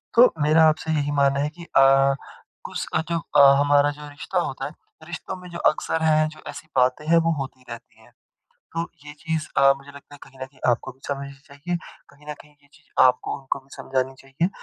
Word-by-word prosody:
तो 240 Hz, +2 st, +7 dB
मेरा 155 Hz, +2 st, +5 dB
आपसे 160 Hz, +1 st, -2 dB
यही 145 Hz, -2 st, 0 dB
मानना 140 Hz, -1 st, +2 dB
है 145 Hz, +1 st, 0 dB
कि 170 Hz, -, -9 dB
अ, 135 Hz, -3 st, +4 dB, 0.5 s
कुछ -, -, -5 dB
अ, -, -, +2 dB
तो 170 Hz, +1 st, -2 dB, 0.2 s
अ, 140 Hz, -1 st, +8 dB
हमारा 145 Hz, 0 st, +4 dB
जो 150 Hz, 0 st, -10 dB
रिश्ता 150 Hz, +5 st, -3 dB
होता 150 Hz, -6 st, -3 dB
है -, -, -5 dB, 0.4 s
रिश्तों 175 Hz, +2 st, -6 dB
में 180 Hz, -1 st, -11 dB
जो 170 Hz, -, -6 dB
अक्सर 160 Hz, +1 st, -2 dB
है 155 Hz, -1 st, +3 dB
जो -, -, -16 dB
ऐसी 155 Hz, -, -9 dB
बातें 125 Hz, +3 st, +2 dB
हैं 170 Hz, +1 st, +5 dB
वो 165 Hz, -, +2 dB
होती 130 Hz, -1 st, -7 dB
रहती 115 Hz, -1 st, -11 dB
हैं। 115 Hz, +2 st, -21 dB, 0.6 s
तो 165 Hz, -, -2 dB, 0.2 s
ये 145 Hz, -, -9 dB
चीज़ 160 Hz, -1 st, -2 dB
अ, 135 Hz, 0 st, +6 dB
मुझे 140 Hz, +1 st, -14 dB
लगता 140 Hz, 0 st, -14 dB
है -, -, -13 dB
कहीं 135 Hz, -, -15 dB
न -, -, -1 dB
कहीं 135 Hz, 0 st, -25 dB
आपको 120 Hz, -, -2 dB
भी 130 Hz, -, -30 dB
समझनी 140 Hz, -1 st, -4 dB
चाहिए। 150 Hz, +5 st, -4 dB, 0.3 s
कहीं 145 Hz, +1 st, -21 dB
न -, -, -4 dB
कहीं 150 Hz, -, -17 dB
ये 140 Hz, -, -26 dB
चीज़ 150 Hz, 0 st, -24 dB
आपको 125 Hz, -1 st, +2 dB
उनको 135 Hz, 0 st, -3 dB
भी 135 Hz, -, -28 dB
समझानी 130 Hz, 0 st, -2 dB
चाहिए 135 Hz, +6 st, -2 dB
145 Hz, 220 wpm, -23 LUFS, 135-155 Hz, 0.6 s, अ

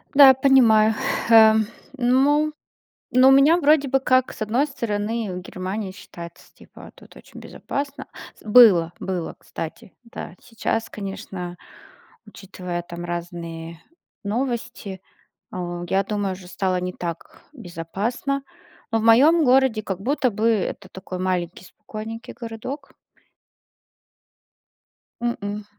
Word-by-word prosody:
Да, 280 Hz, -1 st, +10 dB
я 265 Hz, -, +9 dB
понимаю. 230 Hz, -5 st, +5 dB, 0.3 s
Ха, 220 Hz, -1 st, +7 dB, 0.4 s
ну, 280 Hz, +5 st, +2 dB, 0.6 s
ну, 255 Hz, +1 st, +6 dB
у -, -, +8 dB
меня 280 Hz, +5 st, +6 dB
вроде 295 Hz, -3 st, +3 dB
бы 270 Hz, +1 st, +2 dB
как, 255 Hz, -1 st, +2 dB
с -, -, -14 dB
одной 235 Hz, +7 st, +1 dB
стороны, 225 Hz, -5 st, -3 dB
в -, -, -4 dB
Германии 190 Hz, +2 st, -5 dB
считается, 170 Hz, -2 st, -12 dB
типа, -, -, -14 dB
тут -, -, -18 dB
очень -, -, -13 dB
безопасно 280 Hz, -1 st, -6 dB, 0.3 s
с -, -, -22 dB
Было, 205 Hz, -7 st, +6 dB
было, 180 Hz, -3 st, -4 dB
кстати, 165 Hz, +3 st, -8 dB
да. 230 Hz, -6 st, -9 dB
Сейчас, 225 Hz, -1 st, -3 dB
конечно, 195 Hz, -3 st, -7 dB, 0.7 s
учитывая, 185 Hz, -4 st, -7 dB
там, 175 Hz, 0 st, -8 dB
разные 170 Hz, -1 st, -6 dB, 0.4 s
новости, 215 Hz, -4 st, -4 dB, 0.5 s
а, 175 Hz, -1 st, -5 dB
я 195 Hz, +2 st, +2 dB
думаю, 200 Hz, -1 st, -2 dB
уже 185 Hz, -1 st, -11 dB
стало 185 Hz, 0 st, -1 dB
не 180 Hz, 0 st, -3 dB
так 170 Hz, -2 st, -7 dB
безопасно. 225 Hz, -, -4 dB, 0.5 s
В 225 Hz, -, +2 dB
моем 285 Hz, +9 st, +5 dB
городе 255 Hz, -4 st, +3 dB
как 190 Hz, -2 st, -5 dB
будто 255 Hz, +1 st, 0 dB
бы, 220 Hz, +3 st, +1 dB
это 200 Hz, -2 st, -2 dB
такой 185 Hz, -1 st, -7 dB
маленький 180 Hz, -1 st, -2 dB
спокойненький 220 Hz, +3 st, -9 dB
городок. 250 Hz, +5 st, -7 dB, 2.3 s
М-м. 210 Hz, -3 st, -3 dB
215 Hz, 120 wpm, -23 LUFS, 185-255 Hz, 2.3 s, Да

